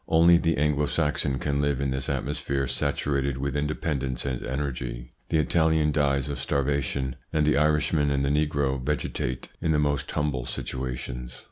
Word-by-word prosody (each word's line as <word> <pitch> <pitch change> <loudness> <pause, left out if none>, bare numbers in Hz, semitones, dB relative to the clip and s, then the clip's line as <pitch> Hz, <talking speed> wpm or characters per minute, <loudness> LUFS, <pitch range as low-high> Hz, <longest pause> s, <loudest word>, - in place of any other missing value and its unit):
Only 85 +1 +6
the 80 -1 +1
Anglo 75 0 +2
Saxon 75 -4 0
can 70 +2 0
live 70 -2 +1
in 70 -1 0
this 65 0 -2
atmosphere 70 0 -1
saturated 70 0 -1
with 70 +1 -2
independence 70 -3 -1
and 65 -3 -2
energy. 60 -3 -4 0.2
The 80 - +2
Italian 80 0 +3
dies 70 -2 +1
of 70 - -4
starvation, 70 -2 -1
and 75 -1 +2
the 75 - +3
Irishman 75 0 +2
and 70 -1 +1
the - - +1
negro 70 -3 +1
vegetate 65 -3 -2
in 80 - +1
the - - +3
most 70 -1 0
humble 70 -5 -1
situations. 60 -1 -5
70 Hz, 160 wpm, -26 LUFS, 65-75 Hz, 0.2 s, Only